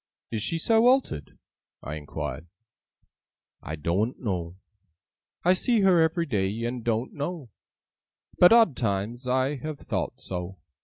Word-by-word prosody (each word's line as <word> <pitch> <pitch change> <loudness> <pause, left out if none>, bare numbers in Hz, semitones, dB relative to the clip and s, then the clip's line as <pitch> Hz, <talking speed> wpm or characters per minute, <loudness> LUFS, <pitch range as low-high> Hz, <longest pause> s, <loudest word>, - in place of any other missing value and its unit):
'Is 110 -2 -2
she 165 - 0
so 225 +7 +3
altered?' 250 - +1 0.5
I 75 - -5
inquired. 75 0 -6 1.1
'I 80 - -5
doen't 90 - -1
know. 90 -7 -3 0.9
I 180 - +6
see 225 +4 +1
her 185 -4 +5
ev'ry 165 +1 +1
day, 105 -3 -1
and 120 0 -4
doen't 115 +2 -1
know; 145 - -5 0.9
But, 180 - +8
odd 225 - +6
times, 115 +3 -2
I 130 +3 +1
have 155 +3 -5
thowt - - -4
so. 90 +1 -6
120 Hz, 135 wpm, -26 LUFS, -, 1.1 s, But